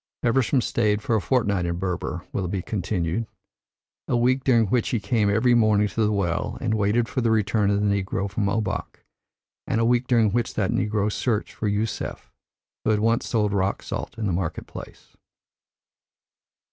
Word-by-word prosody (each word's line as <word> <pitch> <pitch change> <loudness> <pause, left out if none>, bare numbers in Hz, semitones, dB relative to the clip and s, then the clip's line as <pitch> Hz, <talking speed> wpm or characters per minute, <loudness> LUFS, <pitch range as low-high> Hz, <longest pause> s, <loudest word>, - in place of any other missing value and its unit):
"Feversham 125 +2 +2
stayed 105 -3 0
for 120 -4 +1
a 110 - +1
fortnight 100 -9 +1
in 85 - -1
Berber," 90 0 -3
Willoughby 95 -1 -2
continued. 90 +1 -2 0.8
"A 120 - +1
week 130 +2 +2
during 115 -4 +4
which 115 +3 0
he 120 - 0
came 105 +1 +1
every 110 +4 +3
morning 110 -3 +4
to 115 - 0
the 105 - +2
well 90 -5 -1
and 115 -2 -1
waited 110 +2 +1
for 130 - -2
the 115 - +2
return 110 -1 +2
of 100 0 +2
his - - +2
negro 100 0 -1
from 100 0 -1
Obak, 105 -1 -3 0.6
and 115 - 0
a 115 - +2
week 120 +1 +2
during 115 -4 +3
which 120 +1 -1
that 100 -3 0
negro 105 0 0
searched 110 -1 -1
for 110 - -3
Yusef, 105 +2 -3 0.5
who - - 0
had 105 -1 +3
once 115 +2 +1
sold 105 -3 +1
rock 95 0 0
salt - - -5
in 110 - -2
the 95 - 0
market 85 -2 -3
place. - - -11
105 Hz, 180 wpm, -24 LUFS, 100-115 Hz, 0.8 s, during